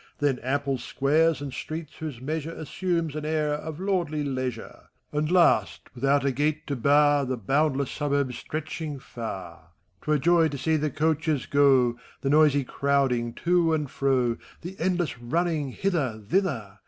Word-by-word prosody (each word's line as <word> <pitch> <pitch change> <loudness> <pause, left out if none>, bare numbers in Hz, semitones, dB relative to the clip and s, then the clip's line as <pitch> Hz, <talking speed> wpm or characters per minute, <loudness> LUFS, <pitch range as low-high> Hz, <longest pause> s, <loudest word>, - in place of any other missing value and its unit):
Then 140 -3 +1
ample 140 +1 -1
squares^ 145 +5 +1
and 140 -2 -5
streets 155 -1 -6
whose 150 -7 -5
measure 155 +4 -3
Assumes 165 -1 -2
an 155 - -4
air 155 -1 0
of 150 +1 -5
lordly 175 -6 -1
leisure; 130 -4 -5 0.2
And 150 +1 -1
last, 180 -2 +3
without 140 +2 +2
u 140 - +2
gate 150 +4 -1
to 140 - -2
bar. 145 +3 +4
The 130 -1 -2
boundless 140 +4 +1
suburbs 140 -4 -1
stretefaing 155 -1 -5
far. 90 -9 -8 0.3
'T - - -8
were 150 - +4
joy 165 +2 +4
to 145 -2 -5
see 160 +4 +1
the 150 0 0
coafches 155 -1 0
go, 130 -4 +3 0.2
The 135 - 0
noisy 145 -2 +5
crowding 130 -3 0
to 170 -2 +3
and 150 -4 -3
fro. 130 -4 +1 0.2
The 180 +3 -7
endless 175 -5 -1
running, 155 +3 -1
hither, 140 - -1
thither. 115 - -1
145 Hz, 155 wpm, -26 LUFS, 130-160 Hz, 0.3 s, noisy